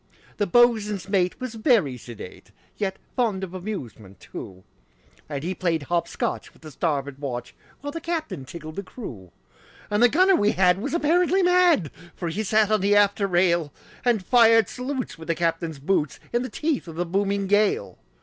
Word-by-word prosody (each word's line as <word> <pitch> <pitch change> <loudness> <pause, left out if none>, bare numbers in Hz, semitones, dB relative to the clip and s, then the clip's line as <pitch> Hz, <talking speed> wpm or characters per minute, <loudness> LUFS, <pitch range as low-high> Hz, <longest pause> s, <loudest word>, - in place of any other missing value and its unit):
The 205 - 0
boatswain's 210 -3 +3
mate 185 -3 +1
was 255 -3 -5
very 215 - +2
sedate, 115 -6 -11 0.3
Yet 195 -2 -2 0.2
fond 220 -7 0
of 185 -1 -6
amusement, 130 - -7
too; 95 -1 -9 0.7
And 140 -1 -4
he 180 +3 -2
played 170 -5 -1
hop 170 +4 0
scotch - - -3
with - - -23
the 155 - -9
starboard 140 -2 -2
watch, 125 -4 -5 0.3
While 290 +1 -5
the 330 - -6
captain 320 - -3
tickled 155 +3 -9
the - - -1
crew. 120 - -9 0.6
And 210 +2 +2
the 245 - +7
gunner 370 +7 +4
we 205 -5 +2
had 180 0 +3
was 280 +7 -2
apparently 350 +4 +3
mad, 355 - +4 0.2
For 170 - -3
he 195 +7 -2
sat 215 +1 +2
on 215 -2 +3
the 200 +1 +3
after 205 0 +3
rail, 175 -4 +2 0.3
And 230 -6 +1
fired 230 -3 +5
salutes 255 -9 -4
with 160 - -10
the 165 - 0
captain's 165 -2 -1
boots, 150 0 0
In 240 - +2
the 255 - -4
teeth 300 - -2
of 165 - -8
the 175 +2 -1
booming 200 +2 0
gale. 205 - +1
195 Hz, 180 wpm, -24 LUFS, 165-235 Hz, 0.7 s, the